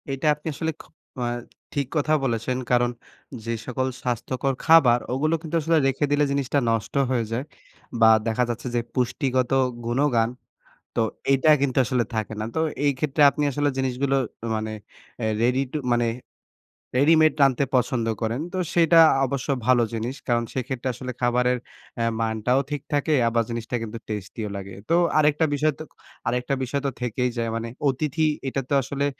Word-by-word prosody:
এটা 135 +2 -2
আপনি 150 +2 -9
আসলে 160 +3 -2
খু - - -19 0.4
আ - - 0 0.5
ঠিক 140 -2 -1
কথা 150 +1 +1
বলেছেন। 120 0 -1
কারণ 120 0 +3 0.5
যে 115 - -2
সকল 130 +1 -1
স্বাস্থ্যকর 130 +2 -1
খাবার 140 -8 +6
ওগুলো 155 +5 +1
কিন্তু 160 -1 -4
আসলে 165 +2 +2
রেখে 135 +2 +1
দিলে 145 0 +3
জিনিসটা 140 0 +1
নষ্ট 115 -2 -1 0.2
হয়ে 120 -3 0
যায় 120 +3 -1 0.6
বা 110 - +8 0.2
দেখা 115 +2 +1
যাচ্ছে 120 +2 -4
যে - - +3
পুষ্টিগত 130 0 0 0.3
গুণাগুণ 120 -2 +2 0.7
তো - - +2 0.3
এটা 135 +3 +3
কিন্তু 140 -2 0
আসলে 120 +1 +1
থাকে 110 0 -2
না। 110 - -2
তো - - +1 0.3
এই 145 - +4
ক্ষেত্রে 150 +2 -1
আপনি 150 +1 -3
আসলে 145 +2 +1
জিনিসগুলো 135 +1 0 0.4
মানে 110 0 -3 0.5
অ্যা 110 - -1
রেডি 125 +3 +2
টু - - -2 0.2
মানে 120 0 +2 0.9
রেডিমেড 155 +3 +5
রানতে 135 -1 +4
পছন্দ 125 -1 +1 0.2
করেন। 115 +4 -1
তো - - -2 0.2
সেটা 170 -1 +5 0.3
অবশ্য 135 0 -3 0.2
ভালো 125 -1 +4
জিনিস। 115 +4 -3
কারণ 120 -2 +2
সেক্ষেত্রে 130 0 -3
আসলে 125 +2 -6
খাবারের 125 +1 +2 0.4
অ্যা 115 0 0
মানটাও 110 +3 +1
ঠিক 145 -2 -2
থাকে, 145 +2 +1
আবার 115 0 +2
জিনিসটা 115 +1 -4
কিন্তু 115 +1 -6
টেস্টি 105 +1 -5
ও - - -6
লাগে। 100 0 -8 0.2
তো 165 - +4 0.2
আরেকটা 150 +1 +3
বিষয় 150 +1 +1
তো - - -5 0.4
আরেকটা 125 +3 0
বিষয় 140 +2 -2
তো - - +2
থেকেই 125 +1 0
যায় 115 -1 -1
মানে 115 0 -3 0.2
অতিথি 150 +4 -1 0.2
এটা 135 +1 -1
তো - - 0
আসলে 140 +2 -2
130 Hz, 170 wpm, -24 LUFS, 120-145 Hz, 0.9 s, বা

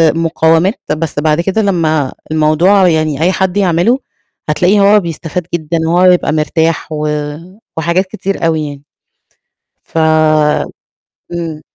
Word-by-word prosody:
مقاومات 165 +4 +1 0.2
بس 155 -2 -3
بعد 155 +2 +1
كده 195 +5 0
لما 160 -8 0 0.2
الموضوع 165 +5 +3
يعني 155 -3 0
أي 180 +3 +3
حد 190 0 -1
يعمله 195 +7 +2 0.5
هتلاقيه 180 +6 +2
هو 205 +1 +5
بيستفاد 170 0 -5
جدًا 165 0 -2
وهو 175 +2 +3
يبقى 180 -4 +3
مرتاح 160 +1 -1
و 150 0 -2 0.7
وحاجات 170 +4 0
كتير 195 -1 -4
أوي 160 -2 0
يعني. 140 0 -9 1.0
ف 165 - -6 1.3
امم. 165 -3 -5
165 Hz, 125 wpm, -13 LUFS, 155-185 Hz, 1.3 s, هو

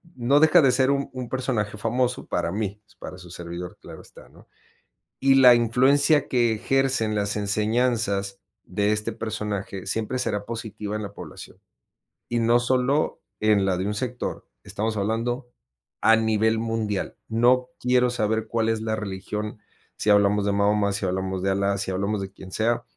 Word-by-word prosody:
no 130 +4 +3
deja 160 +2 +6
de 135 -3 +4
ser 130 +1 +2
un 140 0 0
un 130 -1 -6
personaje 120 -5 -2
famoso 125 +3 -1
para 85 -1 -1
mí, 105 0 -3
pues, - - -25
para 90 - -9
su 90 -1 -12
servidor, 85 +1 -7
claro - - -11
está, - - -15
¿no? - - -19 0.7
Y 135 0 +4
la 125 -2 +8
influencia 135 +5 +3
que 120 -3 +2
ejercen 130 -1 +1
las 100 0 0
enseñanzas 105 -1 0 0.2
de 100 +3 0
este 105 +2 -1
personaje 105 -3 -4
siempre 110 +5 -2
será 105 -5 -1
positiva 110 -2 -5
en 105 - -4
la 100 -1 -7
población, - - -11 0.7
y 120 - 0
no 115 +1 +4
solo 130 +4 +1 0.2
en 105 -2 +3
la 95 -2 +1
de 95 +2 -2
un 105 - -2
sector, 125 +2 -4 0.2
estamos 110 +1 -3
hablando 115 +5 -2 0.5
a 110 0 +6
nivel 110 0 +1
mundial. 110 -3 -2
No 125 +3 +3
quiero 125 0 +2
saber 110 -2 -1
cuál 115 0 0
es 115 -1 0
la 110 0 -1
religión, 105 +1 -5 0.4
si - - -1
hablamos 100 0 +3
de 100 - +1
Mahoma, 100 0 +2
si 100 - -2
hablamos 95 0 -2
de 95 - +1
Allah, 100 +1 0
si 95 - -2
hablamos 100 +2 -1
de 95 0 -6
quien 95 -1 -12
sea, 115 +3 0
110 Hz, 170 wpm, -24 LUFS, 100-120 Hz, 0.7 s, la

